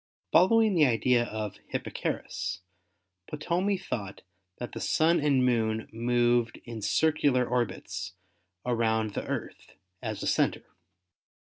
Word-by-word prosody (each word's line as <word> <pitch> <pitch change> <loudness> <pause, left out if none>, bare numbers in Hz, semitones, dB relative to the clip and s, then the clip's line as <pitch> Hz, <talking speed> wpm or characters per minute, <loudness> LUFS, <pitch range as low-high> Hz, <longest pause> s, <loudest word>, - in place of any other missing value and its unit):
Following 220 +3 +5
the 155 -5 +5
idea 120 +1 +2
of 110 -3 -5
Hipparchus, 95 -1 -3 0.7
Ptolemy 180 +6 0
thought 105 - -5 0.3
that 120 - -6
the - - -6
Sun 165 +2 +3
and 140 -4 +3
Moon 110 -3 0
moved 120 0 +1
in 115 -2 -7
circular 145 0 +2
orbits 95 -6 -2 0.5
around 110 -3 +1
the - - -4
Earth - - -6 0.3
as 110 -3 -4
a - - -2
center. - - +1
120 Hz, 115 wpm, -28 LUFS, 110-150 Hz, 0.7 s, Following